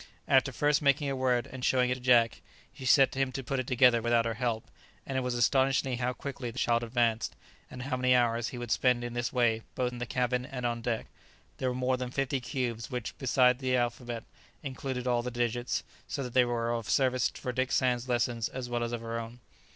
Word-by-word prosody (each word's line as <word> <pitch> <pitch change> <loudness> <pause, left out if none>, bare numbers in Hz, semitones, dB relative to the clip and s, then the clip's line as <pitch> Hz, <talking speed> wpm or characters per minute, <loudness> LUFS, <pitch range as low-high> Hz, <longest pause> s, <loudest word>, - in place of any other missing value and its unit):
After 135 0 +4
first 145 +4 +2
making 140 0 +2
a - - -1
word 125 -2 +1
and 130 0 -9
showing 125 -1 +3
it - - +4
to 125 - -6
Jack, 120 -2 +3 0.3
she 135 -2 -9
set 135 +1 +5
him 135 -1 0
to 135 - -4
put 135 +2 -2
it 130 - -3
together 125 -2 +5
without 120 0 +2
her 115 - -1
help, 115 -1 -1 0.4
and 135 - -5
it 130 - +1
was 125 -1 -2
astonishing 130 +1 +2
how 125 0 0
quickly 130 -1 -6
the 115 - -10
child 120 -1 +2
advanced, 115 -1 0 0.3
and 125 0 -7
how 130 -1 -2
many 125 0 +3
hours 120 -1 +2
he 125 - -6
would 120 -2 -5
spend 125 0 +2
in 120 0 -4
this 120 0 -2
way, 120 -3 +2
both 125 -1 0
in 120 - -8
the 120 - -3
cabin 125 +1 0
and 130 -2 -5
on 120 -1 -1
deck. 115 -1 -2 0.5
There 130 - 0
were 125 - -3
more 130 0 +1
than 125 -1 -4
fifty 135 +1 -1
cubes, 120 -3 -3
which, 125 -3 -4
besides 125 -1 +3
the 130 -1 +1
alphabet, 120 -1 -2 0.4
included 130 -2 -4
all 120 -1 +2
the 125 - -4
digits; 120 0 -1 0.2
so 140 - -3
that 125 -2 -6
they 125 -1 +5
were 120 -1 -1
of 115 -5 -4
service 130 +4 +2
for 125 - -5
Dick 130 +1 -1
Sands' 125 -1 +1
lessons 120 -2 0
as 125 -2 -6
well 120 0 -1
as 120 0 -3
for - - 0
her 115 0 -4
own. 115 +1 -8
125 Hz, 230 wpm, -30 LUFS, 120-130 Hz, 0.5 s, set